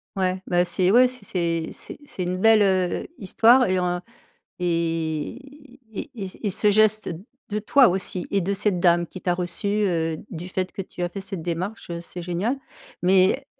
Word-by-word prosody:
Ouais, 185 -1 0
ben 175 0 +2
c'est 180 +1 +1
ouais, 250 +3 +7
c'est 250 -3 -6
c'est 170 -3 -1
c'est - - -8
c'est 190 - -5
une 180 +1 -2
belle, 225 0 +6
heu, 185 -2 +1
histoire 235 +6 +5
et 185 0 +1
en 180 0 -1 0.6
et 165 -2 -1 0.6
et 220 - -6
et 200 -2 -7
et - - +2
ce 210 +3 +2
geste 215 +1 +3 0.4
de 210 0 -1
toi 250 +4 +5
aussi 185 -1 -1
et 200 - +1
de 195 +2 -1
cette 200 -2 0
dame 175 -1 +3
qui 185 - -9
t'a 180 -1 0
reçue, 175 +3 -3
heu, 175 -6 0
du 175 -2 -7
fait 185 0 -3
que - - -5
tu 180 - -10
as 175 - 0
fait 195 +3 -6
cette 190 -2 -6
démarche, 175 +6 -4
heu, 170 0 -4
c'est 175 +1 -7
génial, 180 +9 -1 0.5
mais 190 +8 +3
185 Hz, 190 wpm, -24 LUFS, 175-205 Hz, 0.6 s, ouais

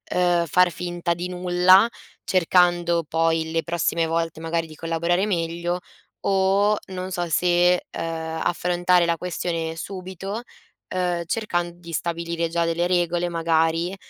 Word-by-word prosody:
uhm, 175 -1 +3
far 180 +3 +3
finta 175 +1 -2
di 175 +1 -5
nulla, 180 +3 +5 0.4
cercando 175 -1 +3
poi 165 0 +1
le 165 0 0
prossime 170 -1 0
volte 165 0 -2
magari 165 0 -1
di 155 - -12
collaborare 170 +4 0
meglio, 170 -1 -1 0.4
o 195 +2 +2
non 185 0 -6
so 175 -1 -2
se, 175 +2 +3
ehm, 160 -1 -4
affrontare 175 0 +2
la 170 0 0
questione 165 -2 -3
subito, 190 +4 -6 0.5
uhm, 180 -2 0
cercand 175 -3 -2
di 170 -1 -12
stabilire 170 0 -2
già 170 0 0
delle 165 +1 0
regole 175 -1 +1
magari, 165 +1 +1
175 Hz, 130 wpm, -23 LUFS, 165-180 Hz, 0.5 s, nulla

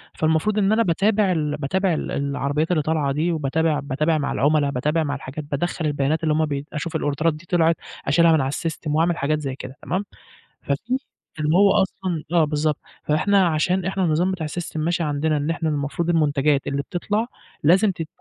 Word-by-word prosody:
فالمفروض 160 +7 +1
إن 205 0 +3
أنا 230 +1 +4
باتابع 200 +2 +2
ال 150 -3 -1
باتابع 180 +6 0
ال - - -3
العربيات 140 +3 -1
اللي 155 -3 +2
طالعة 150 -2 0
دي 160 +5 0
وباتابع 155 0 0
باتابع 150 +4 0
مع 145 - -2
العملاء، 145 0 +2
باتابع 150 +5 0
مع 145 -1 -2
الحاجات، 140 +2 -7
بادخل 165 +3 -2
البيانات 150 +2 0
اللي 155 -1 +2
هُم 155 +1 +2
بي 140 -1 -3
أشوف 160 +2 -4
الأوردرات 155 +1 +1
دي 155 +3 -12
طلعت، 165 -1 +3 0.3
أشيلها 165 +4 +5
من 160 - +4
على 135 0 -1
الsystem 160 +1 -4
وأعمل 170 +2 +2
حاجات 155 +2 0
زي 135 -3 -4
كده 130 0 -9
تمام، 185 +8 -2 0.6
ففي 220 - -1 0.4
اللي 155 +2 +1
هو 200 0 +6
أصلًا 185 -4 -3
آه، 170 -2 +5
بالضبط. 150 0 0 0.3
فإحنا 190 +5 +3
عشان 180 +4 +1
إحنا 190 0 -1
النظام 170 +3 +1
بتاع 165 -4 -3
الsystem 165 +1 -5
ماشي 170 +2 0
عندنا 150 +1 0
إن 145 +2 -1
إحنا 160 -1 -1
المفروض 150 +3 -2
المنتجات 150 -3 +2
اللي 140 0 -1
بتطلع، 205 - -2 0.4
لازم 190 +7 +5
تد 165 -3 -5
155 Hz, 190 wpm, -22 LUFS, 145-175 Hz, 0.6 s, هو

